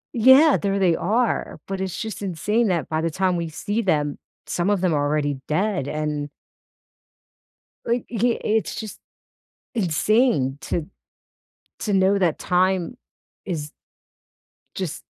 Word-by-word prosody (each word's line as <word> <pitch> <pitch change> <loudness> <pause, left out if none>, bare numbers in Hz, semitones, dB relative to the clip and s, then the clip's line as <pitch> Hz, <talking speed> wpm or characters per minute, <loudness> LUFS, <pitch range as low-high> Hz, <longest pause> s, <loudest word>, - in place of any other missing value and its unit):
Yeah, 260 +6 +7
there 200 -1 0
they 180 -4 +3
are, 230 +7 0
but 195 0 -3
it's 190 -2 -3
just 220 -2 -5
insane 205 +5 0
that 175 -4 0
by 155 0 -1
the 165 - 0
time 185 +2 0
we 170 -1 -2
see 205 +8 -2
them, 150 -8 0 0.3
some 175 +2 -1
of 205 -2 +2
them 180 -3 +2
are 145 -1 +1
already 145 -2 0
dead 185 -2 0
and 150 -1 -2 1.6
like, 235 +1 0
i - - -5
uh, 235 +2 +2
it's 220 0 0
just 220 -2 -7 0.7
insane 180 - +2
to 160 -1 -3 0.9
to 210 - -1
know 195 +1 +3
that 175 -5 +1
time 185 +3 +1 0.5
is 155 -6 -4 1.1
just - - -4
185 Hz, 140 wpm, -23 LUFS, 155-215 Hz, 1.6 s, Yeah